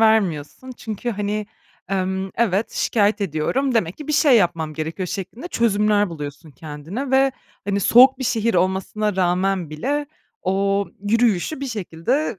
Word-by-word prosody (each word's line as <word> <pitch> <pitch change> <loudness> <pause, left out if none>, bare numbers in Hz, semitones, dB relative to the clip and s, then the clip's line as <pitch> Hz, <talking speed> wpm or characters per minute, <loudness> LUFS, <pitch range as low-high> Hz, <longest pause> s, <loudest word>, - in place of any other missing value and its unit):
vermiyorsun. 220 - +1
Çünkü, 220 +1 -4
hani, 210 0 -2 0.4
emm, 190 0 -1
"Evet, 215 -2 +1
şikâyet 210 -1 +1
ediyorum 200 - 0
demek 185 -6 0
ki 300 -1 -9
bir - - 0
şey 290 -4 +5
yapmam 170 -6 +1
gerekiyor." 160 +4 -4
şeklinde 205 - -6
çözümler 210 - +2
buluyorsun 150 0 -7
kendine 160 - -6
ve, 265 0 +4 0.3
hani, 200 0 0
soğuk 255 +6 +6
bir 260 - -3
şehir 230 -2 +1
olmasına 190 +3 0
rağmen 185 -1 +1
bile 285 - -2 0.4
o 195 +1 +1 0.2
yürüyüşü 230 - +1
bir 275 - -3
şekilde 225 - -2
205 Hz, 140 wpm, -21 LUFS, 180-235 Hz, 0.4 s, soğuk